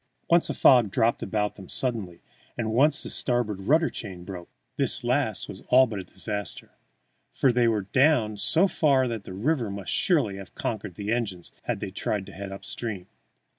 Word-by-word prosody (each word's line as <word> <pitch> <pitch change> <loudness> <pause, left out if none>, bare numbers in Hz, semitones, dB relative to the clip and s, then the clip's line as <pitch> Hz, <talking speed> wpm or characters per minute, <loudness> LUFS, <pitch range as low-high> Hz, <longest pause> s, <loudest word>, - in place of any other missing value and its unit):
Once 170 0 +4
a - - -2
fog 125 -5 +5
dropped 115 +3 +1
about 105 +1 -2
them 95 -2 -11
suddenly, 110 -9 -2 0.3
and 110 -2 -2
once 145 +6 +4
the - - -4
starboard 120 -6 0
rudder 155 - +3
chain 95 -6 -6
broke. 90 -2 -8 0.3
This - - +2
last - - 0
was - - -9
all 130 +1 +7
but 110 -5 -5
a - - -5
disaster, 105 +2 -5 0.6
for 135 - +3
they 120 -1 +2
were 110 -3 +1
down 115 0 +2
so 165 - +3
far 140 -7 +2
that 115 -4 -5
the - - -8
river 120 +3 0
must 100 -2 -5
surely 135 - +2
have 95 -3 -11
conquered 105 -5 -4
the 105 +3 -2
engines 100 -7 -3
had - - -2
they - - -4
tried 105 -3 -2
to 100 - -11
head 95 +1 -7
up 95 - -9
stream. 105 -7 -5
110 Hz, 190 wpm, -26 LUFS, 100-125 Hz, 0.6 s, all